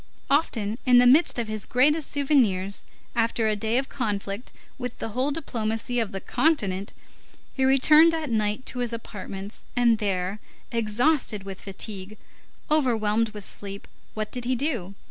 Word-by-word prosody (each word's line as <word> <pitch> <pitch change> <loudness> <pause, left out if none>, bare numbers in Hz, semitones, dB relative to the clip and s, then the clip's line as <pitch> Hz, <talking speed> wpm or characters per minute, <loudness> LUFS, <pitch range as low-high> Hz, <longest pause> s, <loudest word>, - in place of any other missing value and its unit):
Often, 230 -7 +1
in 250 -1 +5
the 245 - +7
midst 275 +6 +5
of 235 -2 -2
his 215 -2 -4
gravest 295 +5 +2
souvenirs, 230 -10 +1 0.3
after 230 -1 +1
a 215 - +2
day 220 +3 0
of 265 +1 0
conflict 205 -2 -3 0.3
with 250 -1 -5
the - - -4
whole 255 +6 0
diplomacy 245 -5 -2
of 225 -4 -1
the 195 - -4
continent, 200 - 0 0.6
he 265 - -1
returned 305 +5 +6
at 310 -5 -3
night 215 +2 0
to 250 - -4
his 240 -1 -1
apartments, 200 -2 -7
and 235 -3 +3
there, 195 0 -1 0.3
exhausted 230 0 +1
with 195 -1 -8
fatigue, 195 +1 -6 0.5
overwhelmed 230 -6 +2
with 210 -2 -9
sleep, 200 0 -7 0.3
what 215 -1 -3
did 245 -1 -4
he 255 +1 +1
do? 235 - -2
230 Hz, 155 wpm, -25 LUFS, 205-260 Hz, 0.6 s, the